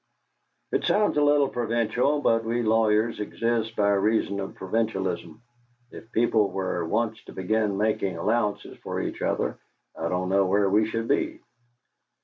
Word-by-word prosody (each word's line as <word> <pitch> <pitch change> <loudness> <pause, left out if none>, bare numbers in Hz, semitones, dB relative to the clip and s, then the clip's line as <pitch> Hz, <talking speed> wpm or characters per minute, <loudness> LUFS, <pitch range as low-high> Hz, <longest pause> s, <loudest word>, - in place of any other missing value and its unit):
"It - - 0
sounds 210 0 +2
a - - +3
little 145 -1 +4
provincial, 120 +4 0
but 115 -4 +2
we 120 +1 -1
lawyers 110 0 +2
exist 115 +1 -1
by 100 -1 +2
reason 100 0 +1
of 95 - -5
provincialism. 95 -2 -2 0.5
If 110 - -12
people 110 -3 +2
were 95 -2 -2
once 110 +3 -1
to - - -11
begin 105 +1 0
making 100 -4 0
allowances 105 +3 -1
for - - -4
each - - -4
other, - - -1 0.4
I - - -3
don't 90 0 -1
know 95 0 +3
where 100 0 +2
we 105 +2 +3
should 115 +1 -3
be." 140 - 0
110 Hz, 150 wpm, -26 LUFS, 100-115 Hz, 0.5 s, little